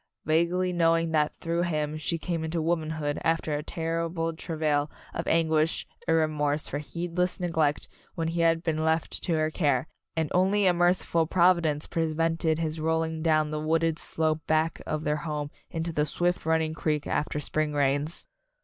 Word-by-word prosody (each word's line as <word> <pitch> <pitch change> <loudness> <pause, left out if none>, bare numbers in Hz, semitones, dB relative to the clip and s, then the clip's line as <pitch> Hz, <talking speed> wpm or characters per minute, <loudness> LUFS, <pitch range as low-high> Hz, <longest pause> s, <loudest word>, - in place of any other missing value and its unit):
vaguely 170 +3 +2
knowing 165 -1 +2
that 150 -1 +2
through 170 +1 0
him 155 -3 -1
she 155 +2 -2
came 165 -1 -3
into 160 +1 -2
womanhood 155 -2 -1
after 165 -1 +1
a 145 - -1
terrible 165 +1 -2
travail 155 -3 -1 0.2
of - - -4
anguish 160 -1 +2 0.2
and 165 -1 +4
remorse 150 -1 0
for 145 - -3
heedless 175 +3 -2
neglect 160 -4 0 0.3
when 165 -2 -1
he 170 +1 -1
had 165 0 +3
been 160 -2 0
left 160 +1 0
to 175 - 0
her 155 0 +1
care, 145 -5 +1 0.3
and 160 -2 -1
only 195 +3 +3
a 180 - +5
merciful 175 -2 +2
provi 175 +1 +4
dence 150 -2 -1
prevented 165 0 0
his 160 -1 -2
rolling 160 0 0
down 155 -2 +2
the 155 - -2
wooded 160 0 +1
slope 155 -1 0
back 160 +1 +1
of 155 0 -2
their 150 0 +1
home 150 -1 -4 0.2
into 165 -1 -3
the 150 0 +1
swift 175 +2 -1
running 160 -1 +2
creek 150 -2 -1
after 150 0 -1
spring 155 0 -1
rains. 145 +2 +1
160 Hz, 170 wpm, -27 LUFS, 155-165 Hz, 0.3 s, a